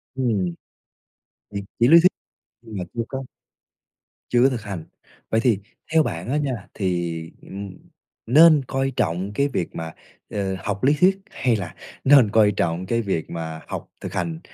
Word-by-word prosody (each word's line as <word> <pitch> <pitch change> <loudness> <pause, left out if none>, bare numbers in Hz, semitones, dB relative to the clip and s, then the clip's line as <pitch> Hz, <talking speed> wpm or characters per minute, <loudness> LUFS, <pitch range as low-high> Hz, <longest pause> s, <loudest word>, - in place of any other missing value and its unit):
Ừm. 105 -9 0 1.0
Thì 100 - -3 0.2
chỉ 120 +1 +5
lý 170 +2 +9
thuyết, 180 +3 +5 0.5
nhưng 110 -3 -9
mà 90 - -3
chưa 115 - -1
có 135 0 -4 1.1
chưa 120 0 +4
có 135 - +6
thực 125 -3 -3
hành. 95 -6 -6 0.5
Vậy 110 - +3
thì 115 -6 +3 0.3
theo 160 -1 +5
bạn 95 -2 -4
á 145 - +1
nha, 130 -9 -2
thì, 85 -4 -1 0.2
ừm, 100 -1 -8 0.5
nên 150 +3 +7
coi 135 0 0
trọng 95 -2 -1
cái 140 +6 +2
việc 120 -11 -3
mà, 80 -1 -5 0.4
ờ, 95 -2 -2
học 105 +1 -3
lý 145 +3 +5
thuyết 195 +2 +4
hay 125 -3 +1
là 90 -3 -5 0.3
nên 135 -6 +6
coi 105 -2 +5
trọng 85 -1 -1
cái 115 +4 0
việc 95 -6 -2
mà 80 -1 -5
học - - -5
thực - - -6
hành? 165 -1 -2
110 Hz, 175 wpm, -23 LUFS, 95-135 Hz, 1.1 s, lý